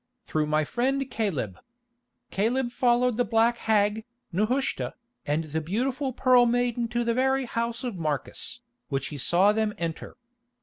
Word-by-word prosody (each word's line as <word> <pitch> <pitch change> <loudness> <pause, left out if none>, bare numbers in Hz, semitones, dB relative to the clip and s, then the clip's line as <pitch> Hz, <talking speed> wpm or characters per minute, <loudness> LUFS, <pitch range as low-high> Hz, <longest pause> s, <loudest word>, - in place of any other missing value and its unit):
"Through 155 -1 0
my 155 0 +2
friend 265 - 0
Caleb. 150 - -2 0.7
Caleb 240 +5 0
followed 245 -1 +2
the 245 - +3
black 230 +1 +2
hag, 215 0 +2 0.3
Nehushta, 225 +9 0 0.3
and 150 +3 +1
the 160 +1 -3
beautiful 255 - -1
Pearl 250 -1 +5
Maiden 240 0 +1
to 240 +1 -1
the 235 0 +1
very 265 +2 +2
house 235 +1 -2
of 235 -8 -4
Marcus, 155 - -3 0.3
which 135 -2 -2
he 150 - -6
saw 180 +9 +4
them 215 -1 0
enter. 165 +5 -5
230 Hz, 145 wpm, -27 LUFS, 170-245 Hz, 0.7 s, Pearl